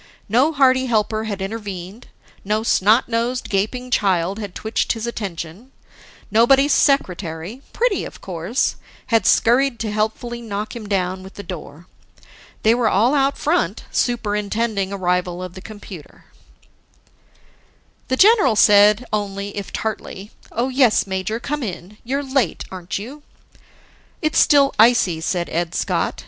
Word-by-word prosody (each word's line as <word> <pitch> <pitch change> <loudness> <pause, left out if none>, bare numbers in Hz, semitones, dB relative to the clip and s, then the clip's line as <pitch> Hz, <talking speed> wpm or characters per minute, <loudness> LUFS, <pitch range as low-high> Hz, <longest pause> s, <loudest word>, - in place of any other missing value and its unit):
No 250 +9 +3
hearty 260 -3 +3
helper 220 -1 0
had 200 -3 -4
intervened, 200 -1 -7 0.4
no 215 +2 -1
snot 220 +2 +3
nosed, 240 +2 -2
gaping 245 +6 -1
child 190 -2 +1
had 205 -4 -7
twitched 220 +1 -1
his 225 -1 -5
attention, 200 0 -6 0.6
nobody's 270 +6 +4
secretary 185 - 0
pretty - - 0
of - - -9
course 185 +7 -2 0.4
had 225 - +3
scurried 250 +2 +3
to 220 -2 -2
helpfully 220 +3 -2
knock 215 0 -5
him 215 -3 -8
down 185 -1 -1
with 190 +1 -12
the 200 - -8
door. 170 -2 -9 0.8
They 220 - +5
were 235 -2 +2
all 225 +8 +3
out 275 -1 +2
front 340 +4 0
superintending 210 -3 -1
arrival 180 -2 -1
of 180 -1 -7
the 185 - -10
computer. 205 -6 -12 1.8
The 260 - -1
general 400 - +5
said 210 +3 +5
only, 200 -1 -3
if 200 -3 -6
tartly, 210 -2 -5 0.2
"Oh 240 +3 -1
yes, 255 -4 +3
major, 190 +3 -3
come 295 +4 -3
in. 200 -2 -7
You're 275 +4 -2
late, 265 - 0
a'n't 180 -2 -5
you?" 255 +9 -8 1.0
"It's 310 -2 +1
still 280 -1 +5
icy," 220 -8 +4
said 175 0 -1
Ed 170 0 -2
Scott. - - -1
215 Hz, 135 wpm, -20 LUFS, 190-245 Hz, 1.8 s, They